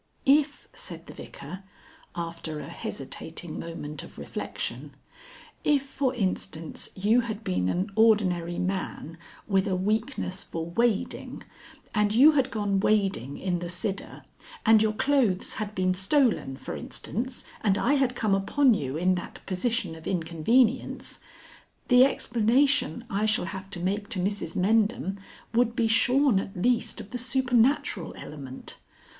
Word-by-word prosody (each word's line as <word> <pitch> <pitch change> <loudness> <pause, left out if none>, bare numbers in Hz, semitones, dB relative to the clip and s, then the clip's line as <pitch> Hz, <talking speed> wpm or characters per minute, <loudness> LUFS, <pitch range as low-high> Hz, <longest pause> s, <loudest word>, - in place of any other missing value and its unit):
"If," 285 +1 +3
said - - -8
the - - -10
Vicar, 185 - -9 0.5
after 165 -2 -5
a - - -6
hesitating 160 +4 -6
moment 150 -3 -6
of - - -13
reflection, - - -5 0.7
"if, 290 -2 +3
for 270 -1 -1
instance, 180 -6 -3
you 215 +6 +3
had 220 -2 -5
been 90 0 0
an 185 - -1
ordinary 185 -6 +3
man 180 -3 -3 0.3
with 195 -1 +2
a 190 - +1
weakness 210 0 -1
for 165 -1 -5
wading, 215 +5 -1 0.5
and 210 -1 +2
you 280 +6 +8
had 270 -4 +2
gone 205 -4 0
wading 195 - +1
in 180 -2 -1
the 175 0 -5
Sidder, 190 +3 -3 0.4
and 220 -1 +7
your 215 0 +2
clothes 245 -6 +1
had 215 -1 -4
been 185 0 +2
stolen, 195 - +2
for - - -6
instance, 250 +3 -4 0.2
and 200 -2 +3
I 255 +7 +2
had 265 -3 +2
come 215 -4 +1
upon 245 +7 +4
you 140 -7 -2
in 180 +3 +3
that - - -12
position 195 -1 -1
of 160 0 -10
inconvenience; 195 +9 +1 0.7
the 250 0 +8
explanation 250 +1 +2
I 205 +1 0
shall 215 -4 +1
have 190 +1 -7
to 185 - -5
make 200 +4 -2
to 205 -5 -1
Mrs 190 -3 -2
Mendham 200 0 +1 0.3
would 235 0 +2
be 230 -1 +2
shorn 250 0 +4
at 195 -1 -6
least 235 +3 +1
of 210 -2 -9
the 250 - -3
supernatural 250 - +1
element. 135 -3 -8
205 Hz, 145 wpm, -27 LUFS, 180-240 Hz, 0.7 s, you